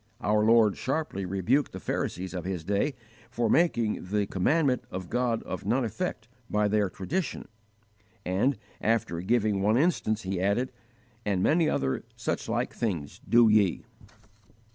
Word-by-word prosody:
Our 105 Hz, 0 st, +2 dB
Lord 110 Hz, -2 st, +5 dB
sharply 130 Hz, -9 st, -2 dB
rebuked 110 Hz, +10 st, +1 dB
the -, -, -6 dB
Pharisees 95 Hz, +2 st, -3 dB
of 90 Hz, -2 st, -4 dB
His 90 Hz, -3 st, -3 dB
day 100 Hz, -, 0 dB, 0.3 s
for 120 Hz, -2 st, 0 dB
making 120 Hz, -, +2 dB
"the 105 Hz, 0 st, +1 dB
commandment 130 Hz, -, +1 dB
of 90 Hz, -1 st, -6 dB
God 120 Hz, -2 st, 0 dB
of 95 Hz, -, -5 dB
none 120 Hz, +5 st, +1 dB
effect 115 Hz, -4 st, -4 dB, 0.2 s
by 105 Hz, 0 st, +2 dB
their 105 Hz, -1 st, +1 dB
tradition," 145 Hz, -, -3 dB, 0.8 s
and, 100 Hz, +9 st, +1 dB, 0.2 s
after 105 Hz, -6 st, 0 dB
giving 105 Hz, 0 st, +1 dB
one 105 Hz, +3 st, +3 dB
instance, 130 Hz, -8 st, +1 dB
He 95 Hz, -1 st, -2 dB
added, 100 Hz, +7 st, +1 dB, 0.5 s
"and 95 Hz, -3 st, 0 dB
many 160 Hz, 0 st, +3 dB
other 65 Hz, -, -1 dB
such -, -, -3 dB
like -, -, -1 dB
things 90 Hz, -11 st, -3 dB
do 120 Hz, -1 st, +6 dB
ye." 105 Hz, -4 st, +3 dB
105 Hz, 145 wpm, -28 LUFS, 95-125 Hz, 0.8 s, do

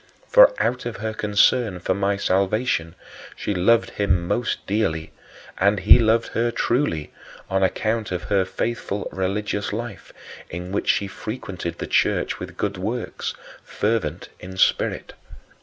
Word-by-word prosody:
For, -, -, +8 dB
out 125 Hz, 0 st, 0 dB
of 120 Hz, -, -5 dB
her 110 Hz, +1 st, -3 dB
concern 105 Hz, -1 st, +2 dB
for 90 Hz, -, 0 dB
my 100 Hz, +1 st, 0 dB
salvation, 95 Hz, -3 st, 0 dB, 0.4 s
she 105 Hz, -, -2 dB
loved 110 Hz, +6 st, +3 dB
him 90 Hz, -4 st, 0 dB
most 120 Hz, +5 st, -1 dB
dearly; 80 Hz, -7 st, -1 dB, 0.5 s
and 100 Hz, 0 st, +3 dB
he 105 Hz, +6 st, +8 dB
loved 115 Hz, 0 st, +2 dB
her 120 Hz, +1 st, 0 dB
truly, 115 Hz, -, -1 dB, 0.4 s
on 95 Hz, 0 st, +2 dB
account 110 Hz, +3 st, 0 dB
of 90 Hz, -1 st, -3 dB
her 100 Hz, -2 st, +2 dB
faithful 100 Hz, +1 st, -3 dB
religious 100 Hz, +2 st, -2 dB
life, 115 Hz, -1 st, -6 dB, 0.4 s
in 90 Hz, +2 st, -6 dB
which 100 Hz, -, -2 dB
she 100 Hz, -, +3 dB
frequented 95 Hz, -5 st, -6 dB
the -, -, -4 dB
church -, -, +1 dB
with -, -, -8 dB
good 100 Hz, -1 st, -2 dB
works, 110 Hz, +5 st, -3 dB, 0.3 s
"fervent 105 Hz, -6 st, -2 dB
in 95 Hz, +1 st, -9 dB
spirit." -, -, +1 dB
100 Hz, 140 wpm, -23 LUFS, 95-115 Hz, 0.5 s, For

